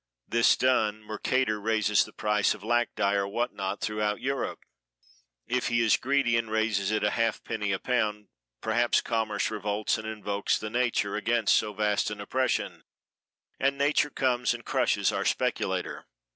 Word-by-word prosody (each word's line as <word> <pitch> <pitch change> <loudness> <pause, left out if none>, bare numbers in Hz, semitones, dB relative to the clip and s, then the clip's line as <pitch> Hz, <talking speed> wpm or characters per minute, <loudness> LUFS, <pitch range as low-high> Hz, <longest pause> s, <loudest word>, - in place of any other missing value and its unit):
This 115 0 +4
done 110 -4 +1
mercator 110 0 -1
raises 110 -1 +2
the - - -13
price 105 -1 +1
of 100 - -14
lac 120 +1 +1
dye 100 -1 +1
or 100 -1 +1
what 120 +5 -2
not 95 0 -4
throughout 105 0 -1
Europe. 135 +2 -3 0.8
If 125 0 -1
he 120 -1 +1
is 115 -2 +4
greedy 135 -3 +1
and 115 -1 -2
raises 110 -3 0
it 110 -1 0
a 105 - +2
halfpenny 110 -2 -1
a 95 - +1
pound, 105 -3 -1 0.3
perhaps 120 +2 +2
commerce 110 -3 -1
revolts 105 0 -1
and 110 - -7
invokes 105 -2 -1
nature 115 -1 -1
against 110 0 +2
so 105 - +1
vast 105 0 0
an 105 -1 -6
oppression, 130 +6 -1 0.8
and 140 +1 +1
nature 145 +1 +2
comes 125 -3 0
and 120 - -11
crushes - - +1
our - - -1
speculator. - - -1
110 Hz, 160 wpm, -28 LUFS, 105-120 Hz, 0.8 s, This